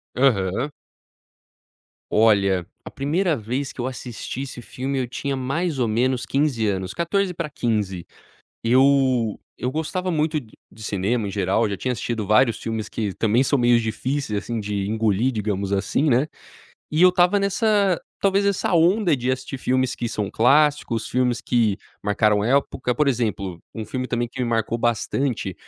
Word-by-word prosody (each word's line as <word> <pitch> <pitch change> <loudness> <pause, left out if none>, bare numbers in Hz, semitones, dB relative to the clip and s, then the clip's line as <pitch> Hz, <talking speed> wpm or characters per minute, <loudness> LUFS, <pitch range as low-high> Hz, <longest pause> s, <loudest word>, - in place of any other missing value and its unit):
Aham. 120 0 +1 1.4
Olha, 100 -5 +3 0.2
a - - -8
primeira 160 +5 0
vez 125 +4 -3
que 125 - -7
eu 125 - -1
assisti 125 0 -6
esse 130 -3 -7
filme, 135 +3 -3
eu 125 - -1
tinha 140 +3 -3
mais 140 +4 -2
ou 120 - +2
menos 125 +3 0
15 135 -6 +1
anos, 95 -1 -2
14 180 +2 0
pra 165 -2 -4
15. 105 - -2 0.6
Eu 130 -2 +3 0.2
eu 125 - 0
gostava 180 +5 -2
muito 155 -1 0
d 110 -4 -17 0.2
de 110 - -13
cinema 105 +2 -1
em - - -4
geral, 100 +3 +1
já 100 - -3
tinha 125 +4 -2
assistido 115 -1 -3
vários 115 +2 +4
filmes 110 -2 -4
que 105 -4 -3
também 115 +3 +2
são 140 0 +1
meio 120 0 +4
difíceis, 115 +1 -2
assim, 115 -1 -4
de 100 -2 -2
engolir, 110 +2 +1
digamos 100 -3 -2
assim, 100 +10 +1
né, 130 +3 +3 0.6
e 155 +2 0
eu 185 - +8
estava 180 +2 +3
nessa, 200 -2 +2 0.2
talvez 200 0 +2
essa 200 -2 0
onda 175 +2 +4
de 125 -2 -1
assistir 130 +1 -3
filmes 130 0 0
que 120 - -3
são 105 -3 -3
clássicos, 135 -3 +2
filmes 125 -2 +1
que 115 -6 +1 0.2
marcaram 105 0 +2
época, 125 -1 +1
por 145 0 +3
exemplo, 100 -8 -2 0.2
um 110 - -4
filme 130 +4 -4
também 120 -1 -1
que - - -9
me 125 - +1
marcou 115 0 0
bastante, 120 -2 -1
125 Hz, 165 wpm, -23 LUFS, 110-140 Hz, 1.4 s, eu